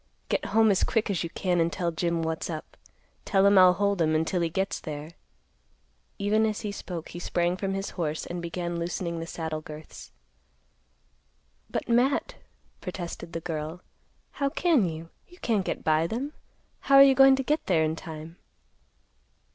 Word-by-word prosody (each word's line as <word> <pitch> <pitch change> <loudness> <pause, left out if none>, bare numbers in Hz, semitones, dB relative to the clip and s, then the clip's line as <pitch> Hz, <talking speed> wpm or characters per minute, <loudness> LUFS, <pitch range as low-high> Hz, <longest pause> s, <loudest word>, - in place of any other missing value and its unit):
Get - - 0
home 220 -1 +4
as 190 - +2
quick 225 -3 +1
as 180 - -1
you 170 - -4
can 180 0 0
and 165 0 +2
tell 170 -1 -1
Jim 170 0 -1
what's 160 +1 -3
up. 155 -2 -6 0.5
Tell 195 -2 +3
him 200 -1 +7
I'll 185 -1 +8
hold 200 -1 0
'em 155 -1 +2
until 165 +3 0
he 170 - +1
gets 190 +4 -1
there." 150 +1 -7 1.1
Even 210 +2 +2
as 215 -1 -3
he 210 -2 -3
spoke, 175 -4 -6
he 175 - -7
sprang 175 0 0
from 195 0 -2
his 195 0 -3
horse 155 -3 -3
and 175 0 -5
began 170 0 -3
loosening 170 0 -3
the 165 - -5
saddle 160 -2 -4
girths. 155 0 -11 1.6
"But, - - -3
Matt," 245 +4 +2 0.5
protested 175 -2 -6
the 165 - -3
girl; 160 +1 -4 0.5
"how 280 -1 -1
can 280 - +2
you? 165 +1 -8 0.2
You 355 - -17
can't 215 - 0
get - - -3
by 155 +1 +2
them. 265 - -4 0.5
How're 275 0 +7
you 275 -1 +6
goin' 270 0 +7
to 270 - -2
get 300 +4 -1
there 165 -4 +3
in 155 0 0
time?" 160 +1 -9
175 Hz, 175 wpm, -27 LUFS, 165-205 Hz, 1.6 s, I'll